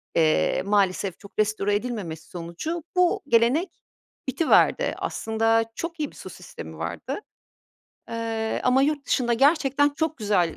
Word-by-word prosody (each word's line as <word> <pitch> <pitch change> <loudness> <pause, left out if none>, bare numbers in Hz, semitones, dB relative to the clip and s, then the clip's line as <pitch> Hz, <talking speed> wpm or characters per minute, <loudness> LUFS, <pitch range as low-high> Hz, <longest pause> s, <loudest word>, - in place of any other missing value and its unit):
eee, 160 -1 +3
maalesef 195 -2 +1
çok 200 0 -13
restore 210 -1 +1
edilmemesi 205 -9 -4
sonucu 180 - -5
bu 360 -1 +3
gelenek 255 +9 +3 0.6
bitiverdi. 310 +5 +3
Aslında 225 +1 +1
çok 335 0 -5
iyi 295 -2 -2
bir - - -19
su - - -9
sistemi - - -10
vardı, - - -4 0.9
eee, 225 -1 -2
ama 255 +1 +4
yurt 290 0 0
dışında 240 -2 +1
gerçekten 285 +1 +3
çok 315 +2 -2
güzel 200 -6 +1
230 Hz, 130 wpm, -25 LUFS, 205-290 Hz, 0.9 s, ama